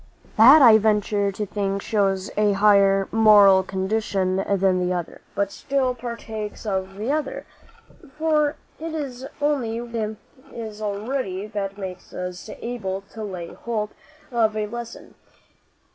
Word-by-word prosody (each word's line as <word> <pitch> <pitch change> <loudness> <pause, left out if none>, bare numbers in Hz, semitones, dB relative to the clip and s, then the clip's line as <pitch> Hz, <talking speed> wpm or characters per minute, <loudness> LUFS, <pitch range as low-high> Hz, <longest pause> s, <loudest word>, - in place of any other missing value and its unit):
"That, 265 +7 +8
I 220 -3 +8
venture 210 -1 +1
to 210 +2 -4
think, 200 -1 -2
shows 195 -3 0
a 210 -1 +3
higher 195 -1 +4
moral 205 -3 +7
condition 190 0 -1
than 195 -1 +1
the 180 0 0
other, 175 -2 -4
but 200 0 0
still 270 -2 -1
partakes 230 -3 -6
of 190 -2 -2
the 215 +7 -2
other; 300 -2 -2 0.7
for 305 -2 +2 0.2
it 320 0 -5
is 265 -4 -5
only 270 -6 0
what 240 0 -7
is - - -4
in 215 0 -3 0.5
us 215 0 -11
already 205 -1 -3
that 200 -2 -4
makes 185 -2 -8
us 180 0 -6
able 195 -6 -3
to 220 - -6
lay 180 -5 -6
hold 215 -3 -3 0.4
of 220 -3 +1
a 215 - 0
lesson. 235 +2 -8
210 Hz, 145 wpm, -23 LUFS, 195-235 Hz, 0.7 s, That